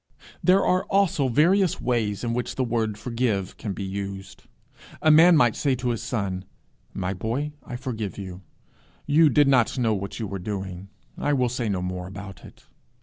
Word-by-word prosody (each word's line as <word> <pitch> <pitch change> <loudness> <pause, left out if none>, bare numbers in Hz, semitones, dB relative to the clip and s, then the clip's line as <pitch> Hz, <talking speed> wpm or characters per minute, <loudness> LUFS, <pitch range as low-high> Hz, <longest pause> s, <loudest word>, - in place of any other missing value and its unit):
There 190 +2 +4
are 185 +2 +2
also 190 -9 +2
various 175 - +3
ways 115 -5 -1
in 115 -1 -1
which 125 +1 -3
the 130 - 0
word 115 -3 -1
forgive 115 -5 -2
can 105 - -4
be 100 - -5
used. 95 0 -6 0.5
A 155 - +4
man 165 +2 +7
might 120 -6 +4
say 140 -3 +1
to 125 0 -2
his 115 -2 -2
son 100 -6 -3 0.5
'My 95 0 -2
boy, 115 +10 -3
I 125 - -7
forgive 115 -5 -5
you. 95 -2 -7 0.6
You 155 +1 +5
did 145 +2 +4
not 130 -2 +3
know 115 -3 +2
what 100 +1 -4
you 110 - -2
were 100 -1 -5
doing. 95 -1 -5 0.3
I 145 - +1
will 125 -3 +2
say 120 -2 -2
no 95 -3 -1
more 90 0 -4
about 95 -1 -9
it.' - - -15
115 Hz, 185 wpm, -25 LUFS, 100-135 Hz, 0.6 s, man